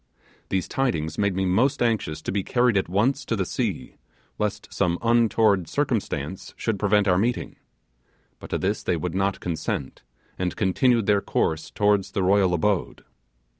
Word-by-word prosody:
These 95 -2 -1
tidings 80 - -1
made 100 -2 +1
me 95 0 0
most 120 +10 +2
anxious 110 -10 -1
to - - -3
be 100 - 0
carried 120 0 +2
at 95 -3 +1
once 125 +10 +1
to 115 - -1
the 95 -3 -1
sea, 105 -4 -3 0.4
lest 105 -1 -3
some 85 -3 +1
untoward 115 -5 +3
circumstance 95 - -2
should 110 -4 -2
prevent 105 0 +2
our 90 -1 +3
meeting; 120 +4 -1 0.8
but - - -10
to - - -1
this 100 +3 -1
they 85 - 0
would 90 +1 -3
not 95 +1 0
consent, 80 -5 -4 0.4
and 90 -1 -1
continued 115 +3 +2
their 100 -1 +3
course 80 -4 -1
towards 105 -2 +1
the 100 - 0
royal 95 -1 +3
abode. 95 +2 -1
100 Hz, 165 wpm, -24 LUFS, 90-115 Hz, 0.8 s, untoward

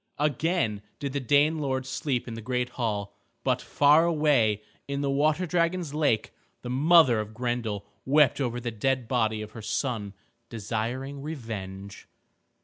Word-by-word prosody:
Again 150 - 0 0.2
did 140 -2 -4
the 140 - 0
Dane 145 +4 +3
lords 130 -3 -2
sleep 130 -2 -2
in 115 - -5
the 115 - -6
great 125 +1 -1
hall, 105 -5 -3 0.3
but - - +1
far 145 +3 +4
away 140 -11 +2 0.2
in 140 0 -2
the 140 -1 0
water 155 +5 +2
dragons' 170 -2 0
lake 145 -8 +1 0.3
the 125 - -4
mother 145 -3 +5
of 110 0 -5
Grendel 120 -4 -2 0.2
wept 145 0 +4
over 120 -2 -1
the 120 -1 -4
dead 125 +3 -1
body 110 -3 0
of 105 - -10
her 110 - -9
son, 105 -3 -2 0.3
desiring 120 +6 -4
revenge. 100 -9 -7
125 Hz, 150 wpm, -27 LUFS, 110-145 Hz, 0.3 s, mother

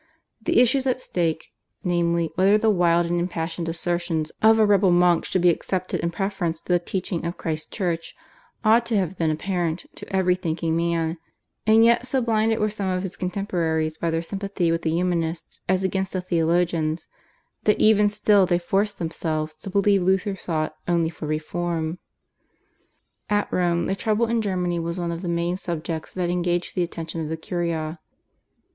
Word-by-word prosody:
The 220 - +2
issues 260 +2 +3
at 255 -1 +1
stake, 165 -8 -2 0.3
namely, 170 -3 +1
whether 195 +4 +4
the 220 0 +3
wild 175 -3 +3
and 175 +1 0
impassioned 170 -1 -3
assertions 170 -2 -2
of 220 +1 +6
a 220 - +5
rebel 200 -2 +4
monk 175 -1 +4
should 185 - 0
be 175 - +7
accepted 185 +2 -2
in 170 - 0
preference 180 -3 -2
to 180 - -2
the 175 - +4
teaching 180 -1 -3
of 170 +1 -3
Christ's 155 -2 -3
Church, 170 -5 -3 0.5
ought 225 +2 +5
to 225 -2 +1
have 190 -2 -1
been 165 -2 +2
apparent 170 +1 -2
to - - -9
every 190 -1 +3
thinking 165 -2 -2
man; 165 0 0 0.5
and 220 +1 +6
yet 235 +2 +3
so 265 +1 +1
blinded 225 -2 +1
were 215 - +1
some 200 -2 -2
of 185 0 -1
his 190 -1 -5
contemporaries 170 -4 -1
by 170 - 0
their 165 0 -1
sympathy 195 -2 -1
with 165 0 0
the 160 - -1
Humanists 170 -1 -1
as 190 0 +2
against 190 0 -1
the 185 - -1
Theologians, 170 -2 0 0.6
that 210 - +3
even 210 -1 +5
still 205 -2 +3
they 175 -1 +3
forced 200 +4 0
themselves 155 -2 -2
to 155 +5 -9
believe 200 0 +3
Luther 190 +2 +1
sought 155 -4 -2
only 170 -2 +1
for 155 - -7
reform. 160 +2 -2 1.3
At 205 0 0
Rome 175 -1 +1
the 190 - 0
trouble 215 +3 +1
in 230 0 0
Germany 180 -4 -1
was 170 +1 -3
one 170 -1 -2
of 170 0 -4
the 180 - -3
main 170 +1 0
subjects 165 -3 -4
that 180 -2 -1
engaged 175 0 -1
the 180 - 0
attention 165 -1 -4
of 155 - -4
the 160 - -3
Curia. 165 -1 -3
175 Hz, 180 wpm, -24 LUFS, 165-195 Hz, 1.3 s, be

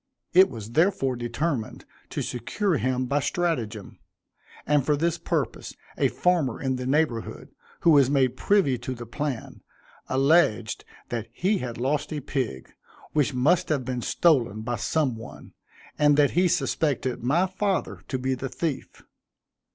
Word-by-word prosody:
It 190 +2 +7
was 110 -2 -8
therefore 145 -4 +2
determined 120 +1 -3 0.2
to - - -3
secure 165 - -1
him 130 0 0
by 140 +3 +1
stratagem, 125 - -2 0.7
and 145 -2 +3
for 150 +2 +1
this 170 +2 0
purpose, - - -3 0.2
a - - +2
farmer 170 -9 +1
in 130 -1 -1
the 125 0 -4
neighborhood, 135 -5 -1 0.3
who 170 - +5
was 140 -4 +6
made 130 -3 +2
privy 145 - +2
to 130 +2 -5
the 120 0 -8
plan, 135 +1 -5 0.5
alleged 135 -5 +2 0.2
that 115 -2 -3
he 190 - 0
had 120 -2 -5
lost 140 +6 -1
a 155 - -2
pig, 125 - -4 0.4
which 145 -3 +1
must 150 +8 +2
have 140 -5 0
been 125 -1 -3
stolen 120 - +2
by 120 +1 -2
some 130 0 0
one, 115 +2 -11 0.5
and 145 -1 +5
that 145 -2 +4
he 180 +2 +3
suspected 140 -6 0
my 155 +9 +3
father 190 0 -2
to 130 - -2
be 130 +1 -1
the 130 +1 -4
thief. 155 -2 -4
135 Hz, 150 wpm, -26 LUFS, 120-160 Hz, 0.7 s, It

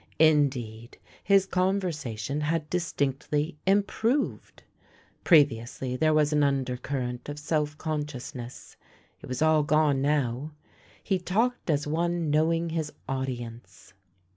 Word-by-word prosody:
In 150 -2 +5
deed, 115 -3 -9 0.3
his 195 0 +4
conversation 160 - -1
had 150 +1 -1
distinctly 150 -2 -1
improved. 220 +7 0 0.6
Pre 155 -5 +7
viously 125 0 -6
there 155 0 +4
was 155 -1 +3
an 150 - +3
undercurrent 130 -2 -2
of 145 - -5
self 150 0 -1
conscious 150 -4 -4
ness; 120 -2 -9 0.4
it - - -10
was 130 +4 -1
all 155 -1 +4
gone 150 -2 +2
now. 140 0 0 0.5
He 190 -2 0
talked 225 +6 -1
as 145 -2 +1
one 165 +1 0
knowing 165 +2 +2
his 160 -2 -2 0.2
audience. 125 -6 -6
150 Hz, 120 wpm, -27 LUFS, 135-165 Hz, 0.6 s, Pre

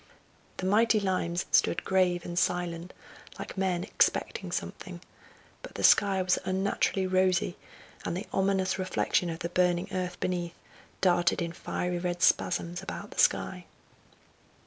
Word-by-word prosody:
The 185 - -4
mighty 220 +3 +4
limes 185 -3 -1
stood - - +3
grave 180 -2 +2
and 175 0 -1
silent, 175 -1 -1 0.5
like - - -7
men 185 -2 0
expecting 200 - 0
something, - - -5 0.6
but - - -11
the - - -4
sky 195 -2 +5
was 180 -1 +2
unnaturally 190 0 0
rosy, 185 -1 +1 0.5
and 175 - -2
the 195 - -5
ominous 190 -1 +1
reflection 185 -1 0
of 165 - -4
the 170 - -2
burning 175 0 +1
earth 180 -1 -3
beneath 175 -2 -2 0.5
darted 175 -2 +3
in 170 -1 -3
fiery 180 +1 -3
red 175 0 -2
spasms 175 0 +2
about 190 - -7
the - - -7
sky. - - +2
180 Hz, 140 wpm, -29 LUFS, 175-190 Hz, 0.6 s, sky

